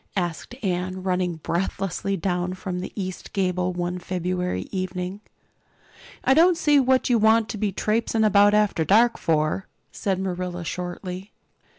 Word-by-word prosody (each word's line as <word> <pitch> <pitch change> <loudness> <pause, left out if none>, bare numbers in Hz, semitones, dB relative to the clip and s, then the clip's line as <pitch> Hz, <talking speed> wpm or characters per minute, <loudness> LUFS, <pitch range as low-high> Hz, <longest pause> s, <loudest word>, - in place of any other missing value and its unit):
asked 175 +6 -3
Anne, 185 0 -2
running 180 -2 0
breathlessly 190 +3 -2
down 180 0 -1
from 185 -1 -4
the 185 - -5
east 185 -3 -5
gable 185 -2 0
one 175 0 -3
February 180 - -2
evening. 185 +1 -3 1.0
"I 265 - +4
don't 335 +4 +5
see 295 -4 +4
what 260 -1 +3
you 235 - +4
want 220 +1 +4
to 215 - -5
be 205 -1 0
traipsing 220 +3 0
about 205 0 +5
after 210 -6 +2
dark 230 +7 +4
for," 155 +3 0 0.2
said 195 -2 -1
Marilla 180 -2 -3
shortly. 180 +3 -5
185 Hz, 145 wpm, -24 LUFS, 180-210 Hz, 1.0 s, don't